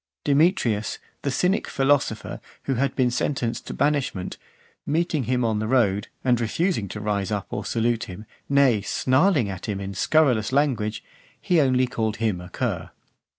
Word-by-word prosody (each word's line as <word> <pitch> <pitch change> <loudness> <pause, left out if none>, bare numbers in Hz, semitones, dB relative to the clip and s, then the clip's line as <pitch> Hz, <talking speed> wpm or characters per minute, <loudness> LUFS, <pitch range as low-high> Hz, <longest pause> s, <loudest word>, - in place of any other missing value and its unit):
Demetrius, 140 - +2 0.2
the 140 - -1
Cynic 180 +9 +1
philosopher, 135 -5 0 0.2
(455) - - -34
who 135 - 0
had 140 +1 0
been 125 -2 +2
sentenced 125 -2 -2
to - - -4
banishment, 140 -10 -1 0.5
meeting 155 -3 0
him 125 0 +1
on 110 -2 0
the 110 - -2
road, 105 -5 +2 0.2
and 120 -2 +2
refusing 120 - 0
to 105 - -6
rise 105 -2 -1
up 100 -2 -1
or 105 - -3
salute 115 +2 0
him, 95 +4 -9 0.2
nay, 140 -6 +4
snarling 130 - +2
at 95 -2 -6
him 100 -2 -2
in 100 0 -5
scurrilous 125 0 +2
language, 130 -7 0 0.4
he 175 -3 +3
only 130 -2 +3
called 110 -3 -2
him 110 -6 -1
a 90 - -10
cur. - - -3
120 Hz, 165 wpm, -24 LUFS, 105-140 Hz, 0.5 s, nay